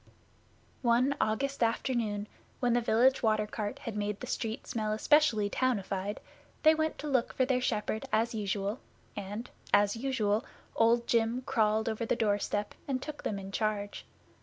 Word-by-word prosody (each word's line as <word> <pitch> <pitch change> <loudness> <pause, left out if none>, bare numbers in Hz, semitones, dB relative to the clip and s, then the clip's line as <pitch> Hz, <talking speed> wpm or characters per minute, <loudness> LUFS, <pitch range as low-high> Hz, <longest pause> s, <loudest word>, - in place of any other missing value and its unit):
One 250 +3 +3
August 275 +6 0
afternoon 225 -3 0 0.3
when 245 -2 +2
the 240 - +3
village 240 +4 +3
water 215 -2 +2
cart 210 -1 -4
had 230 - -6
made 205 -1 -2
the - - -5
street 225 -3 -3
smell 215 -2 -2
specially 260 -6 +4
townified, 205 -4 -1 0.5
they 315 0 +8
went 315 0 -1
to 300 - -5
look 260 -4 +1
for 260 - +2
their 255 -1 +1
shepherd 220 -2 -1
as 230 +2 +2
usual, 205 +1 -2 0.4
and, 205 +4 -5 0.2
as 205 +1 +4
usual, 225 -4 0 0.3
Old 235 +1 +4
Jim 235 +2 +1
crawled 220 -3 +1
over 225 +1 -1
the - - +2
doorstep 205 -2 0
and 265 -2 0
took 295 +2 -7
them 205 - -2
in 195 0 -7
charge. 205 -1 -2
225 Hz, 160 wpm, -31 LUFS, 210-250 Hz, 0.5 s, they